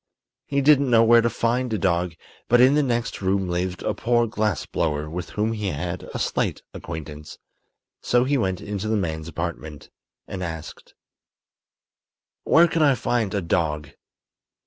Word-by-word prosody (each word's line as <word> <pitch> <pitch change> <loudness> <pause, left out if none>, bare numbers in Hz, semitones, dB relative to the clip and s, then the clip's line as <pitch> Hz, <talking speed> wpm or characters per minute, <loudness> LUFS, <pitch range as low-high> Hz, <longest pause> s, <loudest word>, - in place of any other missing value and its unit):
He 140 0 0
didn't 140 -1 +4
know 115 -1 +5
where 115 +1 +6
to 115 - +1
find 120 +2 -1
a 110 - 0
dog, 90 -3 0 0.3
but 120 - +4
in 130 +3 +6
the 150 - +3
next 120 -6 -2
room 95 0 0
lived 90 0 -2
a - - 0
poor 120 0 +1
glass 110 -4 -1
blower 75 -2 -2
with 85 +3 -6
whom 110 +2 +1
he 105 -2 -3
had 85 +2 -4
a - - -4
slight - - -1
acquaintance; 75 -2 -8 0.6
so 120 0 +2
he 140 +3 +1
went 95 -8 -1
into 105 0 -4
the 110 0 +1
man's 80 -4 -3
apartment 80 -2 -6 0.4
and 95 - -6
asked: 80 -3 -7 1.5
"Where 170 +2 +6
can 165 - -1
I 145 -3 +5
find 115 -3 -1
a 100 - -1
dog?" 75 -3 -1
100 Hz, 165 wpm, -23 LUFS, 85-120 Hz, 1.5 s, where